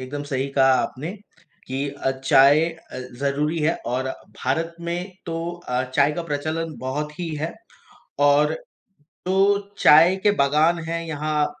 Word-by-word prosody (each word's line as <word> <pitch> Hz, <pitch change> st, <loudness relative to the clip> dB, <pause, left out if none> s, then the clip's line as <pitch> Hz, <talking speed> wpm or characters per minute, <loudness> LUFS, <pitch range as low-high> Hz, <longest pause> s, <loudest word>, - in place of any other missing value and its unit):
एकदम 140 Hz, +3 st, -5 dB
सही 135 Hz, 0 st, -1 dB
कहा 135 Hz, -1 st, +4 dB
आपने 155 Hz, +8 st, -5 dB, 0.5 s
कि 135 Hz, +2 st, -2 dB
अ, 135 Hz, -, -2 dB
चाय 140 Hz, +4 st, +6 dB
अ, 165 Hz, -5 st, -11 dB, 0.2 s
ज़रूरी 145 Hz, +3 st, 0 dB
है 160 Hz, +3 st, +2 dB
और 130 Hz, +2 st, -1 dB, 0.4 s
भारत 165 Hz, +6 st, -1 dB
में 175 Hz, +3 st, -4 dB
तो 165 Hz, -, -3 dB, 0.3 s
अ, 125 Hz, +1 st, 0 dB
चाय 145 Hz, +1 st, +4 dB
का 170 Hz, -, -3 dB
प्रचलन 155 Hz, +1 st, -3 dB
बहुत 150 Hz, +4 st, -4 dB
ही 170 Hz, -, -3 dB
है। 155 Hz, +3 st, -3 dB, 0.7 s
और 150 Hz, +2 st, +4 dB, 0.7 s
तो 195 Hz, +2 st, +3 dB, 0.2 s
चाय 165 Hz, +5 st, +7 dB
के 205 Hz, -, +5 dB
बागान 155 Hz, +5 st, +3 dB
हैं 165 Hz, 0 st, -2 dB
यहाँ 150 Hz, -1 st, -1 dB
150 Hz, 145 wpm, -23 LUFS, 140-165 Hz, 0.7 s, चाय